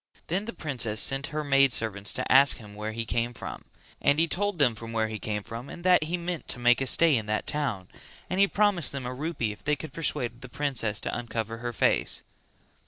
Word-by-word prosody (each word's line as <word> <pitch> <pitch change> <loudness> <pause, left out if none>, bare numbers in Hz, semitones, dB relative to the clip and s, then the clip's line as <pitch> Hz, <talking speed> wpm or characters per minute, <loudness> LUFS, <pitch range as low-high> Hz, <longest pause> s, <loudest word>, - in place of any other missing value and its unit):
Then 190 +5 -1
the 230 - -4
princess 120 -8 -1
sent 135 0 +1
her 155 +1 -3
maid 135 -2 +4
servants 105 -4 -1
to - - -3
ask 135 +1 +7
him 105 -3 -12
where 105 +1 -4
he 115 +1 -4
came 120 +1 -1
from; - - -7 0.4
and 145 +1 +3
he 165 +1 +3
told 205 +3 -1
them 135 -6 +4
where 115 0 -2
he 110 -1 -5
came 105 -1 -3
from 115 +6 -8
and 170 - -9
that 180 -4 +5
he 170 +3 -1
meant 175 -1 -4
to - - -3
make 120 +1 +4
a 135 - 0
stay 165 +2 +5
in 110 -3 -1
that 110 0 -1
town, 115 -11 -2 0.4
and 185 - -2
he 200 - +6
promised 200 -8 +2
them 135 -2 -4
a 125 - -3
rupee 140 -5 -2
if 105 - -12
they 150 0 +2
could 145 0 -8
persuade 125 -7 -2
the 130 - -9
princess 120 -6 -1
to - - -3
uncover 115 -1 -4
her 120 0 -3
face. 105 - +1
130 Hz, 230 wpm, -27 LUFS, 115-155 Hz, 0.4 s, ask